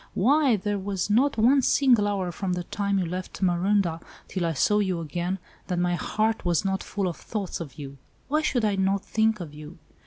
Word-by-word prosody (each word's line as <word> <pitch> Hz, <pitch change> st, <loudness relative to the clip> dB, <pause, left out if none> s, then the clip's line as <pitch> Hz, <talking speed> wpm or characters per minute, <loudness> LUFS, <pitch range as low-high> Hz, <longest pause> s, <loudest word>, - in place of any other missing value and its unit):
"Why, 270 Hz, +4 st, +4 dB
there 205 Hz, 0 st, -2 dB
was 195 Hz, 0 st, -2 dB
not 265 Hz, +6 st, +3 dB
one 255 Hz, +5 st, +5 dB
single 245 Hz, -6 st, +4 dB
hour 190 Hz, -3 st, -1 dB
from 185 Hz, +2 st, -3 dB
the 180 Hz, 0 st, -2 dB
time 200 Hz, +2 st, -1 dB
you 185 Hz, -, +1 dB
left 185 Hz, +3 st, -5 dB
Marondah 180 Hz, -1 st, +2 dB, 0.3 s
till 180 Hz, -3 st, -2 dB
I 165 Hz, -, -1 dB
saw 210 Hz, +9 st, +2 dB
you 190 Hz, -4 st, 0 dB
again, 175 Hz, +3 st, -3 dB, 0.3 s
that 180 Hz, -, -2 dB
my 175 Hz, 0 st, +1 dB
heart 215 Hz, +5 st, 0 dB
was 175 Hz, +1 st, +1 dB
not 190 Hz, 0 st, 0 dB
full 200 Hz, -2 st, -2 dB
of 170 Hz, -, -4 dB
thoughts 205 Hz, -4 st, -4 dB
of 145 Hz, -6 st, -8 dB
you. 140 Hz, -2 st, -8 dB, 0.3 s
Why 305 Hz, +2 st, +1 dB
should 245 Hz, -7 st, +1 dB
I 205 Hz, -2 st, +1 dB
not 195 Hz, +1 st, +1 dB
think 220 Hz, -1 st, +1 dB
of 165 Hz, -5 st, -7 dB
you? 150 Hz, +2 st, -10 dB
195 Hz, 210 wpm, -26 LUFS, 175-215 Hz, 0.3 s, one